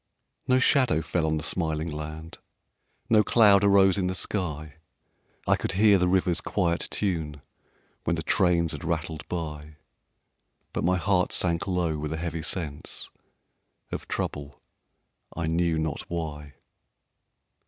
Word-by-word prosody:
No 130 - +4
shadow 130 - +3
fell 85 -3 -1
on 80 0 0
the 75 - -4
smiling 80 -1 -1
land, 75 +2 -7 0.7
No 110 -2 +5
cloud 105 -4 +5
arose 100 -1 +5
in 90 - 0
the 95 - -2
sky; 80 -5 -3 0.7
I - - +5
could - - -3
hear 100 0 +5
the 90 - +2
river's 90 -1 +2
quiet 85 -4 0
tune 80 -8 -2 0.6
When 85 - 0
the 80 - -4
trains 85 -2 +2
had 75 - -6
rattled 80 -1 -3
by; 75 -3 -5 1.0
But - - -2
my 90 +1 +2
heart 90 0 +1
sank 85 +1 +1
low 85 -5 0
with 75 0 -4
a 80 - -2
heavy 85 0 -4
sense 80 -3 -5 0.8
Of - - -5
trouble, 70 -1 -4 0.8
I 85 - -1
knew 85 0 +1
not 80 -2 -2
why. 75 -4 -5
85 Hz, 140 wpm, -26 LUFS, 80-90 Hz, 1.0 s, No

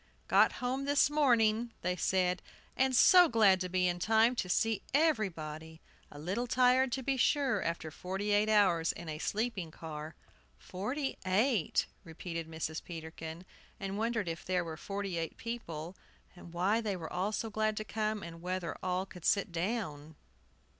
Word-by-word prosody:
"Got - - +5
home 260 +2 -2
this 285 +1 +3
morning!" 235 -5 +3
they 180 - 0
said. 180 0 +1 0.3
"And 265 0 +2
so 355 +6 +7
glad 205 -5 +4
to 185 - -2
be 180 0 +2
in 175 0 -1
time 220 +5 +4
to 180 - -2
see 225 +3 +1
everybody, 160 - 0 0.3
a - - -12
little 190 +11 -2
tired, 255 +1 +4
to 265 - -2
be 270 +1 0
sure, 260 -4 +2
after 170 -2 -3
forty 190 +6 -3
eight 205 +1 +3
hours 185 -6 +4
in 170 - -9
a 155 -1 -5
sleeping 210 -3 -2
car!" 155 -1 -8 0.4
"Forty 255 +10 -4
eight!" 200 - +2 0.2
repeated 165 0 -6
Mrs. 160 0 -4
Peterkin; 160 0 -8 0.3
and 195 0 -4
wondered 220 -2 -1
if 165 0 -4
there 180 -1 0
were 160 -1 -5
forty 195 0 -4
eight 165 -1 -4
people, 180 -8 -6 0.4
and 175 -1 -12
why 190 +6 +1
they 210 -3 -2
were 165 -3 -7
all 185 +4 0
so 220 +1 -3
glad 215 0 0
to 215 - -2
come, 215 -1 -2
and 165 0 -9
whether 180 -1 -3
all 185 +1 -1
could 180 -3 -13
sit 200 0 +2
down. 165 -5 -3
190 Hz, 165 wpm, -32 LUFS, 170-225 Hz, 0.4 s, so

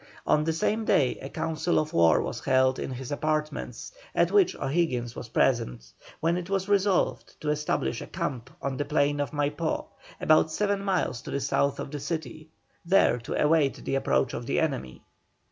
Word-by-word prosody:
On 150 - +3
the 165 - +1
same 210 +7 0
day 135 -11 +2
a 135 - -6
council 160 +2 -1
of 155 0 0
war 85 -1 +4
was - - -5
held 130 0 +3
in - - -3
his 130 0 -6
apartments, 155 - -2 0.2
at - - +3
which 405 -3 +4
O'Higgins 130 -6 -1
was - - -7
present, - - 0 0.3
when 165 +2 +1
it 180 0 -5
was 195 -1 0
resolved 200 -2 +1
to 150 - -1
establish 150 - -1
a - - -7
camp 130 -2 -4
on 135 -1 -2
the 145 - -1
plain 145 -1 +1
of 145 -2 -1
Maipó 145 +3 -1 0.3
about 155 0 +4
seven 200 +2 0
miles 185 - 0
to - - -9
the 140 - -1
south 140 0 0
of - - -5
the 145 - -4
city, 155 0 -5 0.3
there 170 -9 +4
to 115 - -4
await 150 -2 +2
the - - -2
approach 135 -2 +1
of 120 - -5
the - - +1
enemy. 135 - -2
150 Hz, 185 wpm, -27 LUFS, 130-165 Hz, 0.3 s, war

